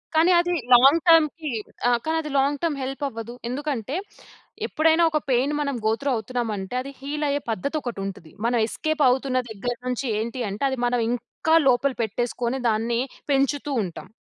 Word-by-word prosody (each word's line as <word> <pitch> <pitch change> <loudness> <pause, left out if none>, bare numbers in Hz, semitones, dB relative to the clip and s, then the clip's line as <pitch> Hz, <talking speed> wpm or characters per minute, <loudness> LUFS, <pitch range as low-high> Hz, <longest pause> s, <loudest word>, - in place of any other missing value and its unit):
కానీ 330 +3 +5
అది 350 +1 +1 0.2
లాంగ్ 275 +7 +7
టర్మ్‌కి 320 -2 +4 0.4
ఆ! - - +5 0.2
కానీ 320 +1 0
అది 305 - -6
లాంగ్ 280 +1 +2
టర్మ్ 320 -4 0
హెల్ప్ 270 +2 -5
అవ్వదు. 230 -2 -7 0.2
ఎందుకంటే, 270 -1 -3 0.7
ఎప్పుడైనా 320 +2 +3
ఒక 305 - +2
పెయిన్ 260 +4 +2
మనం 280 -2 -1
గో 220 - +4
త్రూ 280 - 0
అవుతున్నామంటే 220 -2 -3
అది 275 +2 -7
హీల్ 295 +2 -3
అయ్యే 285 +1 0
పద్ధతి 280 - -3
ఒకటుంటది. 195 - -6
మనం 240 +1 +2
ఎస్‌కేప్ 310 +5 -1
అవుతున్న 255 0 +1
దగ్గర 245 +4 -3
నుంచి 250 +2 -2
ఏంటి 235 +3 -4
అంటే, 200 +6 -5
అది 265 - -3
మనం 245 0 +1
ఇంకా 245 +6 0
లోపల 260 +2 +3
పెట్టేసుకొని 240 +3 -2
దాన్ని 230 +2 0 0.3
పెంచుతూ 280 +1 +1
ఉంటాం. 180 +1 -7
265 Hz, 165 wpm, -24 LUFS, 235-295 Hz, 0.7 s, లాంగ్